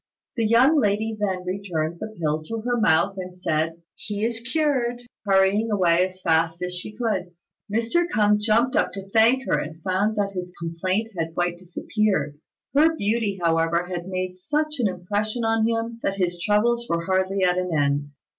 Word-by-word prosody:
The 230 Hz, -3 st, +1 dB
young 260 Hz, +8 st, +5 dB
lady 220 Hz, 0 st, 0 dB
then 190 Hz, -3 st, -1 dB
returned 175 Hz, -4 st, -3 dB
the 220 Hz, -, -4 dB
pill 155 Hz, -1 st, 0 dB
to 225 Hz, +5 st, -4 dB
her 245 Hz, +2 st, 0 dB
mouth, 195 Hz, 0 st, +3 dB
and 180 Hz, -1 st, -7 dB
said, 165 Hz, -1 st, -1 dB
"He 210 Hz, +1 st, -4 dB
is 230 Hz, -1 st, -2 dB
cured," 245 Hz, -2 st, 0 dB, 0.2 s
hurrying 195 Hz, +3 st, +3 dB
away 180 Hz, -3 st, +3 dB
as 185 Hz, 0 st, -14 dB
fast 165 Hz, +1 st, +1 dB
as 180 Hz, 0 st, -3 dB
she 210 Hz, +4 st, -7 dB
could. 190 Hz, -7 st, -2 dB, 0.4 s
Mr. 235 Hz, +11 st, +1 dB
K'ung 210 Hz, -1 st, +3 dB
jumped 230 Hz, +4 st, +2 dB
up -, -, +1 dB
to 195 Hz, 0 st, -7 dB
thank 235 Hz, +4 st, +4 dB
her, 150 Hz, -, +1 dB
and 155 Hz, +2 st, -6 dB
found 195 Hz, +4 st, +1 dB
that 200 Hz, -1 st, 0 dB
his 180 Hz, -2 st, -6 dB
complaint 185 Hz, +6 st, -2 dB
had 165 Hz, -1 st, -3 dB
quite 175 Hz, 0 st, -1 dB
disappeared. 175 Hz, -4 st, -1 dB, 0.3 s
Her 315 Hz, +3 st, +4 dB
beauty, 210 Hz, -5 st, -1 dB
however, 165 Hz, +1 st, +2 dB
had 175 Hz, -1 st, -5 dB
made 185 Hz, -1 st, -3 dB
such 300 Hz, +10 st, -2 dB
an 235 Hz, -, +3 dB
impression 205 Hz, +5 st, -2 dB
on 225 Hz, 0 st, +2 dB
him 230 Hz, 0 st, -2 dB
that 195 Hz, -, -1 dB
his 175 Hz, -2 st, -1 dB
troubles 235 Hz, +5 st, +2 dB
were 170 Hz, 0 st, -1 dB
hardly 190 Hz, +1 st, +1 dB
at 180 Hz, 0 st, +3 dB
an 180 Hz, 0 st, -2 dB
end. 145 Hz, -2 st, +1 dB
195 Hz, 180 wpm, -24 LUFS, 175-225 Hz, 0.4 s, young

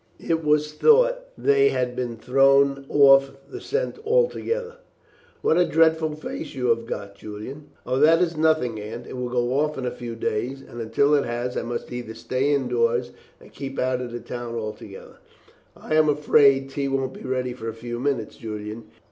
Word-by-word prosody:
It 165 Hz, -1 st, -1 dB
was 150 Hz, 0 st, +1 dB
thought -, -, +4 dB
they 420 Hz, 0 st, +4 dB
had 125 Hz, -, -1 dB
been 120 Hz, -2 st, -3 dB
thrown 135 Hz, +3 st, +3 dB
off 135 Hz, -1 st, +6 dB, 0.2 s
the -, -, -7 dB
scent 470 Hz, 0 st, -2 dB
altogether." 475 Hz, +1 st, 0 dB, 0.7 s
"What 165 Hz, -, +3 dB
a 180 Hz, -, +5 dB
dreadful 160 Hz, -1 st, +2 dB
face 155 Hz, 0 st, -7 dB
you 125 Hz, -2 st, -1 dB
have 115 Hz, 0 st, +1 dB
got, 100 Hz, -4 st, -5 dB
Julian!" 110 Hz, +9 st, -9 dB, 0.2 s
"Oh, 130 Hz, -, 0 dB
that 160 Hz, +3 st, +6 dB
is 175 Hz, -2 st, 0 dB
nothing, 155 Hz, -8 st, +1 dB
Aunt; 115 Hz, +3 st, -7 dB
it -, -, -8 dB
will 125 Hz, -1 st, -3 dB
go 125 Hz, +2 st, 0 dB
off 150 Hz, 0 st, 0 dB
in 130 Hz, -, -4 dB
a 125 Hz, -, -1 dB
few 120 Hz, -2 st, -7 dB
days, 120 Hz, +5 st, -3 dB
and 120 Hz, -, -8 dB
until 115 Hz, +6 st, +2 dB
it 145 Hz, -, +3 dB
has 120 Hz, +1 st, -3 dB
I -, -, -1 dB
must 120 Hz, +1 st, -5 dB
either 120 Hz, -2 st, -6 dB
stay 130 Hz, +5 st, -1 dB
indoors 460 Hz, -, +1 dB, 0.3 s
or -, -, -16 dB
keep 135 Hz, -1 st, -7 dB
out 130 Hz, 0 st, 0 dB
of 125 Hz, -1 st, -6 dB
the 120 Hz, -, -5 dB
town 120 Hz, 0 st, -6 dB
altogether." 110 Hz, -3 st, -7 dB, 0.6 s
"I -, -, -5 dB
am 155 Hz, -1 st, +4 dB
afraid 140 Hz, -2 st, +4 dB
tea 140 Hz, 0 st, -2 dB
won't 135 Hz, -1 st, -1 dB
be -, -, -11 dB
ready 130 Hz, -1 st, -2 dB
for 115 Hz, -2 st, -6 dB
a -, -, -5 dB
few 120 Hz, +1 st, -6 dB
minutes, 130 Hz, -5 st, -2 dB
Julian. 105 Hz, 0 st, -7 dB
135 Hz, 190 wpm, -24 LUFS, 120-150 Hz, 0.7 s, off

